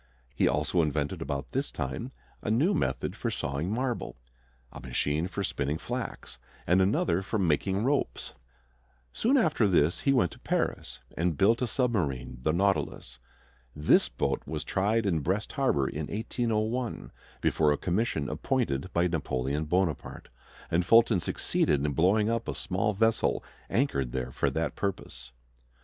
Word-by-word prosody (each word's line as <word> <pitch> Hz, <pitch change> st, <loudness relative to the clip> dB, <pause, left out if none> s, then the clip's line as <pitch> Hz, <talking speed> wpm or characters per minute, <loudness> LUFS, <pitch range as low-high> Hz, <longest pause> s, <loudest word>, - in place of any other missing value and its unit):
He -, -, +2 dB
also 75 Hz, +4 st, +1 dB
invented 75 Hz, +2 st, -1 dB
about 70 Hz, -3 st, -4 dB
this 135 Hz, +2 st, -1 dB
time 75 Hz, -, -4 dB, 0.3 s
a -, -, -3 dB
new 140 Hz, -, +3 dB
method -, -, -1 dB
for -, -, -2 dB
sawing 70 Hz, +7 st, -2 dB
marble, 125 Hz, +1 st, -2 dB, 0.6 s
a -, -, -9 dB
machine 75 Hz, +5 st, -1 dB
for 100 Hz, +1 st, -4 dB
spinning 70 Hz, -4 st, -1 dB
flax, 65 Hz, -4 st, -5 dB, 0.3 s
and 90 Hz, +3 st, +4 dB
another 95 Hz, -2 st, +2 dB
for 100 Hz, +3 st, -2 dB
making 95 Hz, +3 st, +1 dB
ropes. 140 Hz, +3 st, -1 dB, 0.8 s
Soon 265 Hz, +5 st, +2 dB
after 155 Hz, -, +3 dB
this 85 Hz, -3 st, +3 dB
he 140 Hz, -, +2 dB
went 120 Hz, -10 st, +3 dB
to -, -, -13 dB
Paris, -, -, -2 dB, 0.2 s
and 85 Hz, -2 st, 0 dB
built 115 Hz, +5 st, +4 dB
a 125 Hz, -, +1 dB
submarine, 75 Hz, -, -1 dB
the 75 Hz, -, +1 dB
Nautilus. 85 Hz, -8 st, -1 dB, 0.6 s
This 75 Hz, 0 st, +4 dB
boat -, -, -1 dB
was 75 Hz, 0 st, -3 dB
tried 105 Hz, +3 st, +1 dB
in 85 Hz, -5 st, +1 dB
Brest 95 Hz, +8 st, -1 dB
Harbor 130 Hz, -, +1 dB
in 75 Hz, +2 st, -4 dB
1801, 115 Hz, +2 st, -2 dB, 0.3 s
before 75 Hz, -2 st, +2 dB
a 75 Hz, -, +1 dB
commission 90 Hz, -5 st, -1 dB
appointed 85 Hz, -, -1 dB
by 85 Hz, +1 st, +3 dB
Napoleon 70 Hz, -2 st, -1 dB
Bonaparte, 85 Hz, -1 st, -1 dB, 0.4 s
and 85 Hz, +2 st, +3 dB
Fulton 115 Hz, +1 st, +5 dB
succeeded 75 Hz, -3 st, 0 dB
in 75 Hz, -, +1 dB
blowing 95 Hz, +8 st, +3 dB
up 115 Hz, 0 st, -1 dB
a -, -, -3 dB
small 100 Hz, +4 st, -1 dB
vessel 110 Hz, +2 st, +2 dB, 0.3 s
anchored 70 Hz, -, 0 dB
there 65 Hz, -1 st, -3 dB
for -, -, 0 dB
that -, -, -2 dB
purpose. 65 Hz, -10 st, -4 dB
90 Hz, 150 wpm, -29 LUFS, 75-110 Hz, 0.8 s, Fulton